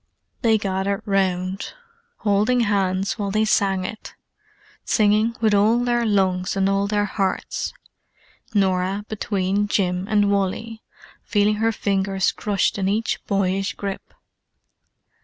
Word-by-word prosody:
They 225 Hz, -2 st, +4 dB
gathered 195 Hz, 0 st, -2 dB
round, 190 Hz, -1 st, -1 dB, 0.5 s
holding 210 Hz, +4 st, +2 dB
hands 195 Hz, -1 st, 0 dB
while 200 Hz, -1 st, -1 dB
they 215 Hz, +2 st, +1 dB
sang 195 Hz, -3 st, +1 dB
it; 215 Hz, -, -8 dB, 0.7 s
singing 215 Hz, +1 st, +2 dB
with 220 Hz, -2 st, +3 dB
all 210 Hz, +3 st, +4 dB
their 240 Hz, -1 st, +1 dB
lungs 190 Hz, -2 st, +1 dB
and 195 Hz, 0 st, +2 dB
all 195 Hz, 0 st, +1 dB
their 205 Hz, 0 st, +1 dB
hearts: 195 Hz, -2 st, -2 dB, 0.8 s
Norah 195 Hz, -1 st, 0 dB
between 205 Hz, -1 st, -1 dB
Jim 185 Hz, -2 st, 0 dB
and 205 Hz, -1 st, +2 dB
Wally, 210 Hz, +3 st, -2 dB, 0.4 s
feeling 210 Hz, 0 st, +1 dB
her 225 Hz, +1 st, +2 dB
fingers 195 Hz, -2 st, 0 dB
crushed 205 Hz, -1 st, -1 dB
in 190 Hz, 0 st, 0 dB
each 220 Hz, +3 st, -1 dB
boyish 195 Hz, +1 st, 0 dB
grip. 200 Hz, -1 st, -6 dB
200 Hz, 120 wpm, -22 LUFS, 190-215 Hz, 0.8 s, They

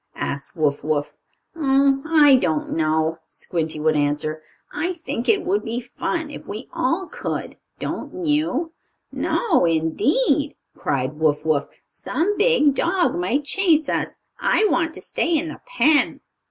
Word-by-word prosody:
asked 140 Hz, +1 st, -4 dB
Wuff 145 Hz, -2 st, 0 dB
Wuff. 150 Hz, -1 st, -1 dB, 0.4 s
"Oh, 275 Hz, -2 st, +3 dB
I 300 Hz, -4 st, +7 dB
don't 160 Hz, -9 st, -1 dB
know," 160 Hz, +1 st, 0 dB
Squinty 160 Hz, -3 st, -3 dB
would 155 Hz, 0 st, +2 dB
answer. 150 Hz, +1 st, -1 dB, 0.3 s
"I 335 Hz, +5 st, -1 dB
think 320 Hz, -8 st, -4 dB
it 410 Hz, -3 st, +3 dB
would 395 Hz, +4 st, 0 dB
be 230 Hz, +2 st, -3 dB
fun 295 Hz, +5 st, -4 dB
if -, -, -10 dB
we 215 Hz, +5 st, -6 dB
all 335 Hz, +9 st, 0 dB
could; -, -, -5 dB, 0.2 s
don't 365 Hz, -, -5 dB
you?" 310 Hz, +1 st, 0 dB, 0.4 s
"No, 450 Hz, -, +1 dB
indeed!" 170 Hz, -, +1 dB, 0.2 s
cried 135 Hz, +2 st, -2 dB
Wuff 155 Hz, -1 st, +1 dB
Wuff. 155 Hz, -3 st, +1 dB, 0.2 s
"Some 390 Hz, +6 st, -2 dB
big 420 Hz, -, +4 dB
dog 345 Hz, +5 st, +1 dB
might 190 Hz, +12 st, 0 dB
chase 315 Hz, -1 st, +2 dB
us. -, -, -2 dB, 0.2 s
I 435 Hz, -, +3 dB
want 330 Hz, -1 st, 0 dB
to -, -, -7 dB
stay 335 Hz, -1 st, 0 dB
in 320 Hz, +2 st, -2 dB
the -, -, -9 dB
pen." 315 Hz, -, +2 dB
270 Hz, 145 wpm, -22 LUFS, -, 0.4 s, I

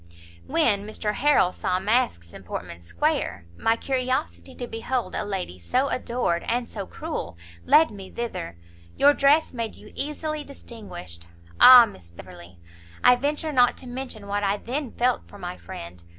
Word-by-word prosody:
"When 200 Hz, -3 st, +2 dB
Mr 215 Hz, -1 st, -2 dB
Harrel 275 Hz, -8 st, +3 dB
saw 185 Hz, -2 st, -1 dB
masks 190 Hz, -, 0 dB
in -, -, -10 dB
Portman 85 Hz, -1 st, -7 dB
square, 85 Hz, 0 st, -1 dB
my 225 Hz, -, +2 dB
curiosity 250 Hz, -, -2 dB
to 245 Hz, -, -5 dB
behold 230 Hz, -2 st, -3 dB
a -, -, -2 dB
lady 190 Hz, -, -4 dB
so 255 Hz, -, 0 dB
adored, 235 Hz, -9 st, -1 dB
and 240 Hz, 0 st, 0 dB
so 200 Hz, -3 st, -6 dB
cruel, 85 Hz, +1 st, -5 dB, 0.3 s
led 315 Hz, +1 st, +6 dB
me 195 Hz, -2 st, -9 dB
thither; 185 Hz, -, -5 dB, 0.4 s
your 285 Hz, +1 st, +6 dB
dress 290 Hz, +2 st, +3 dB
made 230 Hz, -3 st, -4 dB
you -, -, -14 dB
easily 300 Hz, +1 st, -3 dB
distinguished. 205 Hz, -, -10 dB, 0.3 s
Ah 250 Hz, -2 st, +11 dB
Miss 90 Hz, -, -12 dB
Beverley! 85 Hz, +1 st, -13 dB, 0.5 s
I 250 Hz, -, +7 dB
venture 295 Hz, +4 st, -2 dB
not 245 Hz, -2 st, +4 dB
to -, -, -10 dB
mention 245 Hz, -4 st, -6 dB
what 205 Hz, +1 st, -2 dB
I 200 Hz, +1 st, +1 dB
then 255 Hz, +3 st, -4 dB
felt 245 Hz, +1 st, 0 dB
for 205 Hz, -, -13 dB
my 180 Hz, -2 st, -6 dB
friend! 85 Hz, -, -10 dB
215 Hz, 160 wpm, -25 LUFS, -, 0.5 s, Ah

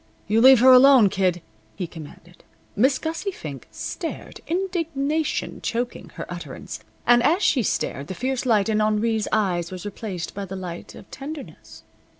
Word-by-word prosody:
"You 220 Hz, +2 st, +3 dB
leave 260 Hz, -1 st, +8 dB
her 260 Hz, +1 st, +8 dB
alone, 255 Hz, -4 st, +7 dB
Kid," 185 Hz, -3 st, 0 dB, 0.3 s
he 180 Hz, -, -3 dB
commanded. 165 Hz, +2 st, -13 dB, 0.3 s
Miss 260 Hz, +6 st, +3 dB
Gussie 325 Hz, +5 st, -3 dB
Fink 150 Hz, -, -8 dB
stared, 330 Hz, -, -6 dB
indignation 325 Hz, -4 st, -2 dB
choking 240 Hz, +1 st, -3 dB
her -, -, -5 dB
utterance. -, -, -7 dB, 0.3 s
And 240 Hz, 0 st, +5 dB
as 340 Hz, +10 st, +2 dB
she 265 Hz, -, +3 dB
stared 140 Hz, -8 st, -2 dB
the 190 Hz, -, -6 dB
fierce 260 Hz, +4 st, -2 dB
light 215 Hz, -4 st, +3 dB
in 215 Hz, -1 st, +1 dB
Henri's 215 Hz, +1 st, +1 dB
eyes 180 Hz, -5 st, 0 dB
was 185 Hz, +1 st, -7 dB
replaced 200 Hz, -4 st, -5 dB
by 200 Hz, 0 st, -5 dB
the 190 Hz, 0 st, -7 dB
light 180 Hz, -2 st, -7 dB
of -, -, -14 dB
tenderness. 285 Hz, +1 st, -9 dB
225 Hz, 155 wpm, -23 LUFS, 190-275 Hz, 0.3 s, leave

